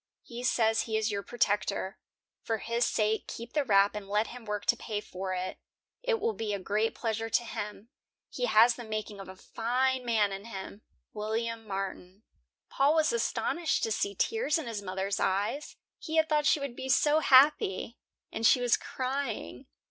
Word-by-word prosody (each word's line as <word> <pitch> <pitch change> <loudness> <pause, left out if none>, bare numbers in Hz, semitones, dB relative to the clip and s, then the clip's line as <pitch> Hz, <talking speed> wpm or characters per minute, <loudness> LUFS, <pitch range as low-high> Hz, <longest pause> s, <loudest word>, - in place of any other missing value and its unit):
He 240 0 -8
says 225 -3 +3
he 220 - +1
is 220 0 0
your 200 -1 -2
protector. 205 -3 -1 0.4
For 225 - -1
his 235 +3 0
sake 215 0 0
keep 235 +1 -8
the 295 - +2
wrap 200 -4 +4
and 205 -2 -7
let 210 +2 +2
him 245 -1 -10
work 210 -1 -3
to - - +3
pay 215 -2 -4
for 185 -2 -5
it. 185 +1 -4 0.4
It - - 0
will 445 +2 0
be 215 - -2
a - - -4
great 210 +4 0
pleasure 225 -1 -2
to 240 - +2
him. 210 -1 -6 0.4
He 245 -1 -1
has 225 +2 +6
the 240 - -7
making 215 -2 -5
of 195 - -9
a 190 - -9
fine 255 +6 -1
man 220 -4 +2
in 195 +2 -6
him. 200 -1 -8 0.3
WILLIAM 225 +1 -3
MARTIN." 195 0 -5 0.4
Paul 285 +3 +2
was 315 +6 +3
astonished 345 -7 0
to 225 - 0
see 200 -1 -1
tears 445 - +1
in 320 - -4
his 225 -3 -4
mothers 190 0 -2
eyes; 200 +10 -1 0.2
he 320 - -5
had 320 0 +4
thought 300 -1 +2
she 305 - +4
would 280 -4 -5
be 265 - -6
so 295 +3 +4
happy, 260 -7 +4 0.3
and 225 - -5
she 250 - +6
was 245 -1 +3
crying. 260 - -4
225 Hz, 185 wpm, -30 LUFS, 205-255 Hz, 0.4 s, has